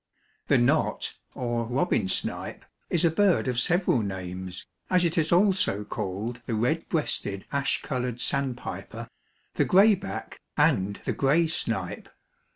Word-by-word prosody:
_) - - -45
The - - +4
Knot - - +1 0.2
or 120 -2 -1
Robin 125 - 0
Snipe 95 - -2 0.2
is 170 0 +2
a 165 - +4
bird 190 -3 +3
of 125 -1 0
several 175 -1 +2
names, 95 -3 -5 0.2
as 180 -1 +3
it 165 - 0
is 160 -1 +1
also 180 - +3
called 105 +4 -4
the 115 - -1
Red 125 +9 0
breasted 100 - -1
Ash 140 -1 +1
colored 125 -2 -3
Sandpiper, 135 -3 -3 0.4
the - - +2
Gray 200 +4 +6
back 95 - -6 0.2
and 95 +2 +2
the - - 0
Gray 150 +5 +3
Snipe. 160 - -2
125 Hz, 145 wpm, -27 LUFS, 105-165 Hz, 0.4 s, Gray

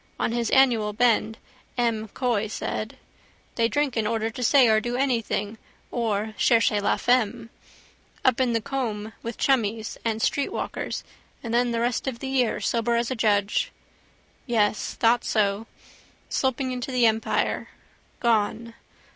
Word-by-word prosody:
On - - 0
his 235 -1 -1
annual 235 -6 +3
bend, 225 -1 +2 0.4
M'Coy 230 -1 0
said. 215 +1 -4 0.6
They 230 -1 +2
drink 290 0 0
in 220 -2 0
order 225 0 -1
to 250 - -7
say 255 +1 +5
or 215 -1 +4
do 240 +2 -2
something 230 -5 -1 0.3
or 220 -2 -1
cherchez 225 -3 +3
la - - +1
femme. 240 -1 +1 0.7
Up 260 0 +3
in 245 -2 +2
the 230 - +1
Coombe 220 -4 -3
with 230 -1 -6
chummies 225 -4 0
and 225 -1 -1
streetwalkers 280 +5 -2 0.4
and 230 -1 -4
then 245 +1 +3
the 230 -1 -1
rest 240 +2 -1
of 260 -3 -2
the 265 - -5
year 255 -4 +1
sober 235 0 0
as 235 +1 0
a - - -1
judge. 205 -3 +1 0.8
Yes. 215 -3 0
Thought 235 +1 +3
so. 210 0 0 0.6
Sloping 260 0 0
into 250 +1 -4
the 250 -2 +3
Empire. 220 0 0 0.5
Gone. 230 0 0
230 Hz, 145 wpm, -25 LUFS, 220-245 Hz, 0.8 s, say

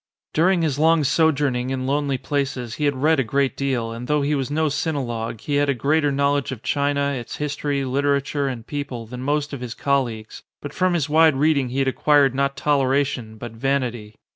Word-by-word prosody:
During 175 +2 +3
his 145 -3 -1
long 160 0 +4
sojourning 140 -4 +1
in 130 -1 -2
lonely 140 0 0
places 130 -4 -3
he - - +2
had 145 -1 +1
read 160 -1 +4
a - - +3
great 135 +4 0
deal, 130 -5 -1
and 115 +2 -7
though 150 0 +1
he 145 +2 0
was 135 -2 -1
no 155 +2 0
sinologue 120 -7 -3
he 145 -1 -1
had 145 0 +2
a 140 - +2
greater 145 +4 +1
knowledge 140 -1 +1
of 120 -4 -7
China, 140 0 0
its 125 -4 -5
history, 145 -1 -2
literature, 140 +1 0
and 120 -4 -5
people, 135 -5 -5
than 125 +3 -8
most 145 +2 -1
of 135 - -5
his 120 -2 -6
colleagues; 120 -6 -2 0.2
but 145 0 -8
from 185 -1 +1
his 155 -5 0
wide 155 0 +5
reading 140 -2 +2
he 130 - -5
had 135 -1 +1
acquired 140 0 +3
not 140 +1 -1
toleration 135 -5 0
but 120 +1 -7
vanity. 120 -3 -2
140 Hz, 200 wpm, -22 LUFS, 125-145 Hz, 0.2 s, wide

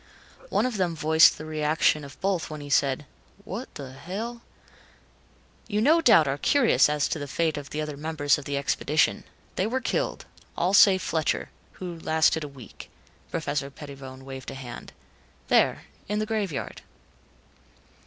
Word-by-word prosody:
One - - +1
of 250 -4 -2
them 175 -3 0
voiced 160 0 +5
the 155 - -8
reaction 155 0 +1
of 140 0 -11
both 190 -4 0
when 155 -1 -6
he 145 0 -8
said, 140 +1 +2 0.4
"What 225 +8 -7
the 135 -2 -7
hell 205 - -6 0.6
" - - -32
"You 210 -1 0
no 310 +9 +4
doubt 165 - +6
are 135 +1 -1
curious 245 - +4
as 150 -1 +1
to 160 - -2
the 145 - -5
fate 160 +3 0
of 145 -2 -7
the 155 - -3
other 150 -1 -4
members 145 -1 0
of 140 - -10
the 140 0 -2
expedition. 145 +2 +1 0.3
They 190 - +1
were 255 +4 -1
killed, - - -2 0.3
all 180 +3 +1
save 195 -2 +6
Fletcher, 160 -2 -1 0.2
who 175 -3 -7
lasted 160 0 +2
a - - -4
week." 135 -6 -12 0.4
Professor 140 -1 -2
Pettibone 135 -2 -10
waved 135 -1 -7
a 135 - -7
hand. 125 -3 -9 0.6
"There - - +3 0.3
in 210 - 0
the 215 - 0
graveyard." 210 -8 -3
155 Hz, 165 wpm, -26 LUFS, 140-190 Hz, 0.6 s, doubt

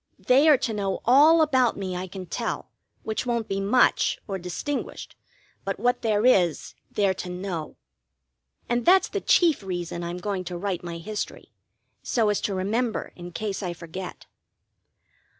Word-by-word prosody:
They 275 +5 +4
are 295 - +7
to 230 - -2
know 195 -2 -2
all 305 +6 +7
about 260 -5 +2
me 190 -2 -4
I 180 +1 -4
can 185 0 -8
tell, - - -4 0.3
which 220 +3 -3
won't 235 -2 -1
be 195 - -2
much 205 +6 +3
or 195 -2 -3
distinguished, 180 - -5 0.5
but 195 -1 -3
what 245 +3 +1
there 215 0 +1
is 180 - +3 0.2
they're 200 -2 +1
to 180 - -6
know. 180 -3 -5 0.9
And 240 0 0
that's 375 +2 +5
the - - -3
chief 330 -8 +4
reason 175 -2 -4
I'm 170 +1 -4
going 190 0 -3
to 175 +1 -5
write 190 -1 -3
my 170 -1 -5
history, 205 +5 -6 0.5
so 225 -3 +1
as 205 - 0
to 200 - -1
remember 220 +5 -1
in 175 0 -9
case 205 +3 -3
I 180 -3 -3
forget. 175 +2 -8
200 Hz, 165 wpm, -25 LUFS, 180-240 Hz, 0.9 s, are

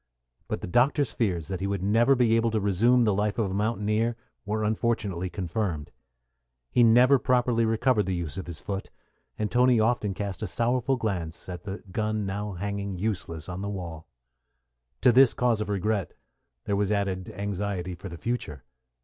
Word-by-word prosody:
But - - -3
the - - -5
doctor's 125 - +2
fears 90 -9 -1
that 95 -2 -4
he 95 - -2
would 100 -2 -2
never 115 +7 +4
be 120 -3 +3
able 115 0 +2
to 110 -1 0
resume 110 +5 +3
the 105 -3 +3
life 105 +1 0
of 105 -5 0
a - - -3
mountaineer 110 +2 0 0.3
were 110 +1 -1
unfortunately 105 -4 -1
confirmed. 90 -3 -3 0.8
He 125 - +3
never 125 +4 +6
properly 125 -2 +2
recovered 110 -1 +2
the 95 - 0
use 85 -4 -3
of 95 -2 -6
his 85 -2 -7
foot; 100 -1 -5 0.5
and 105 -1 -2
Toni 125 -1 +4
often 110 -3 +1
cast 100 -2 -4
a 110 - -2
sorrowful 125 +6 +1
glance 95 -9 -3
at 90 +2 -7
the 100 +1 -6
gun 110 +1 -1
now 100 +1 -3
hanging 100 +1 -4
useless 90 -6 -3
on 90 +1 -5
the 100 - -3
wall. 85 -5 -6 0.9
To - - +6
this 130 +1 +6
cause 120 -3 +1
of 105 - -3
regret 100 0 -1 0.5
there 100 - -1
was 100 0 0
added 95 -3 -1
anxiety 100 -2 -3
for 90 +3 -8
the 85 - -8
future. 80 - -4
105 Hz, 180 wpm, -27 LUFS, 95-115 Hz, 0.9 s, never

